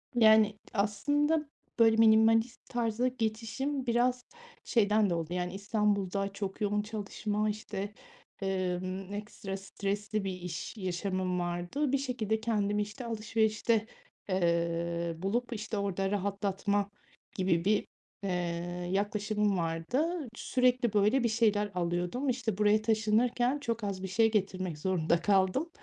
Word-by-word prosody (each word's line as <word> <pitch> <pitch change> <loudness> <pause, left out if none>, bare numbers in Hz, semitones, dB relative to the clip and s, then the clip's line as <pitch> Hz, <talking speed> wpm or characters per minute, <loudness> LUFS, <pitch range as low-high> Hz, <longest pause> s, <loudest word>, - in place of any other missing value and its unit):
Yani, 220 -2 +6 0.2
aslında, 290 +10 +1 0.3
böyle, 225 -1 +6
minimalist 225 +1 +4
tarza 240 0 0
geçişim 250 +3 -2
biraz 245 +1 +1 0.4
şeyden 210 -2 +3
de 175 - +1
oldu, 165 +1 -3
yani, 180 0 -2
İstanbul'da 200 -1 0
çok 200 0 -5
yoğun 210 0 +1
çalışma, 210 0 -2
işte, 205 -1 -4 0.5
ımm, 185 0 -2
ekstra 205 -2 -5
stresli 200 +2 -3
bir 190 -1 -2
iş 180 +3 -6
yaşamım 185 -1 -1
vardı. 175 +11 -1
Bir 275 - +3
şekilde 235 -5 -1
kendimi, 210 -2 +1
işte, 210 +5 -6
alışverişte, 220 0 +1 0.4
eee, 170 -1 0
bulup, 235 +8 -1
işte, 215 0 -4
orada 195 -1 -1
rahatlatma 200 0 0 0.5
gibi 180 -3 +1
bir, 210 +1 +2 0.4
eee, 195 - -1 0.6
yaklaşımım 210 0 0
vardı. 250 - -1
Sürekli, 250 -2 +1
böyle, 210 +5 +3
bir 235 - +2
şeyler 210 -2 +2
alıyordum, 175 +9 -1
işte, 235 -5 -1
buraya 210 +1 +4
taşınırken 230 +4 +2
çok 230 -5 -3
az 195 -2 -3
bir - - -2
şey 225 +4 +3
getirmek 185 -5 -1
zorunda 170 -1 +1
kaldım 195 - +2
210 Hz, 125 wpm, -31 LUFS, 190-225 Hz, 0.6 s, Yani